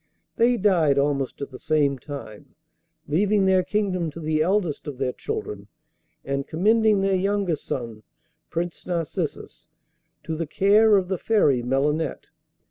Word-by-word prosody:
They 240 +1 +3
died 170 -9 +3
almost 140 -1 0
at 140 - -7
the 130 - -10
same 145 -3 +1
time, 130 -6 -9 0.5
leaving 195 +6 +2
their 190 -1 +4
kingdom 185 -4 -1
to 155 - -10
the 155 -1 0
eldest 175 -3 0
of 145 -3 -5
their 130 -1 -1
children, 100 -1 -5 0.6
and 140 0 -2
commending 215 +4 +3
their 195 0 +1
youngest 190 -4 0
son, 115 -4 -5 0.5
Prince 170 +1 -4
Narcissus, 170 -4 -4 0.6
to 160 - -4
the 165 0 -3
care 205 +5 +4
of 185 -2 0
the 185 -2 -2
Fairy 150 - +2
Melinette. 140 +5 -1
165 Hz, 140 wpm, -24 LUFS, 140-195 Hz, 0.6 s, their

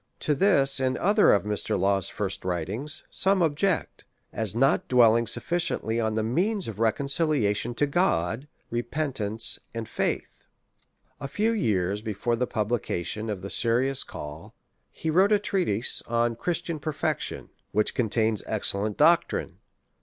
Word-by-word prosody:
To 150 - +2
this 140 -5 +3
and 130 -1 0
other 205 +3 +4
of 100 - +3
Mr. 105 -1 -1
Law's 95 0 +1
first 95 -2 -4
writings, 95 - -1
some 190 -1 +3
object, 165 +4 -1 0.3
as 110 -2 -2
not 135 +3 +2
dwelling 115 -2 +4
sufficiently 120 - -1
on 110 -1 -1
the 110 - 0
means 185 - 0
of 110 -2 -7
reconciliation 120 -2 0
to 145 - +2
God, 135 - 0 0.2
repentance, 120 -3 -1 0.2
and 115 -1 -4
faith. - - -3 0.7
A 140 - -5
few 210 +10 0
years 105 - 0
before 110 +2 -2
the 125 +1 -1
publication 110 -2 -2
of 100 -3 -4
the 100 - -6
Serious 130 +3 +2
Call, 75 +2 -9 0.4
he 160 - -3
wrote 190 +6 +4
a 210 - +6
treatise 180 - -1
on 115 0 +1
Christian 170 +4 -3
Perfection, 155 0 -3 0.2
which 105 +1 +1
contains 110 -2 +1
excellent 105 -1 0
doctrine. 170 +3 +2
120 Hz, 140 wpm, -26 LUFS, 105-155 Hz, 0.7 s, a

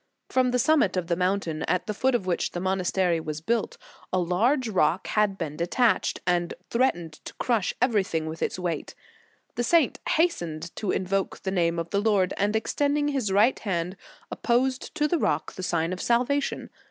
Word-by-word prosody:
From 255 -1 +2
the 250 - +1
summit 250 -8 +3
of 180 - 0
the 170 0 0
mountain, 180 -3 -1
at 180 +2 0
the 210 - -3
foot 260 +5 +1
of 200 - -1
which 180 -2 -1
the 175 - -3
monastery 185 -2 +1
was 155 -1 -5
built, 235 - -1 0.3
a 185 - +1
large 225 - +2
rock 185 -3 +1
had 210 -2 +1
been 155 -5 -4
detached, 215 +9 +1
and 175 -1 0 0.2
threatened 175 -11 0
to - - -8
crush 230 -6 0
everything 200 -10 +1
with 160 +1 -6
its - - -1
weight. 175 -4 -3 0.6
The 240 - -1
saint 320 +2 +3
hastened 170 - 0
to 210 - -3
invoke 190 +1 -1
the 190 - -1
name 170 -2 +1
of 165 0 -4
the 200 - +1
Lord, 200 -4 +2
and 205 +2 +1
extending 290 +6 +1
his 260 -8 -1
right 210 +6 +4
hand, 180 -3 -2 0.4
opposed 255 +2 0
to 300 - +2
the 335 +2 +1
rock - - 0
the - - -7
sign 170 -1 0
of 185 - -5
salva 250 +4 +2
tion. - - -5
195 Hz, 190 wpm, -26 LUFS, 175-245 Hz, 0.6 s, right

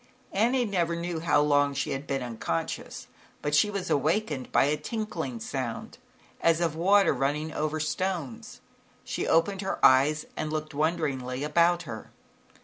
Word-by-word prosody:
Annie 240 +5 +2
never 175 -5 0
knew 170 0 -3
how 160 -3 +3
long 145 -1 +3
she - - -2
had 135 +2 -4
been 135 -2 -1
unconscious, 110 -9 -4 0.4
but 150 - -1
she 180 +8 +4
was 200 -3 -3
awakened 150 -2 0
by - - +4
a 145 +2 +2
tinkling 220 +8 -4
sound, 130 - -5 0.4
as 165 0 +3
of 165 -3 0
water 195 +4 +4
running 150 +3 -1
over 155 +1 -1
stones. 160 -5 -3 0.4
She - - -3
opened 190 +4 +2
her 195 -1 -2
eyes 145 +4 +5
and 155 0 -3
looked 155 -1 -3
wonderingly 140 -4 -1
about 170 +3 +3
her. 115 -7 -8
155 Hz, 150 wpm, -27 LUFS, 140-175 Hz, 0.4 s, eyes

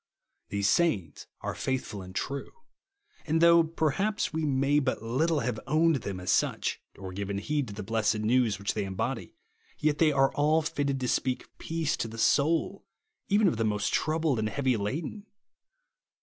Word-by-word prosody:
These 100 0 0
sayings 100 - +1
are - - -3
faithful 130 -6 -3
and 95 0 -11
true; 140 +1 -3 0.8
and 160 +1 +2
though 170 0 +7
perhaps 165 +7 -1
we 160 0 -1
may 140 +1 +2
but 130 -2 -1
httle 140 +6 0
have 115 -2 -2
o^vned 155 -1 +3
them 95 -3 -5
as 90 - -1
such, - - 0 0.2
or 95 -1 -7
given 100 +1 -3
heed 145 +7 -1
to 105 - -7
the 105 - -5
blessed 110 +1 +1
news 110 -1 +2
which 100 +1 -2
they 105 -2 -2
embody, 120 - -3 0.4
yet 150 -1 +1
they 160 -2 +5
are 135 -1 +3
all 155 +2 +2
fitted 140 -2 -1
to 125 - -1
speak 130 +1 -1
peace 165 -2 -1
to - - -2
the 115 0 -9
soul 150 +8 +2 0.4
even 205 0 +4
of 160 - +1
the 115 - +1
most 105 -1 0
troubled 155 -5 +1
and 110 0 0
heavy 130 0 +1
laden. 150 - -4
135 Hz, 175 wpm, -28 LUFS, 110-155 Hz, 0.8 s, though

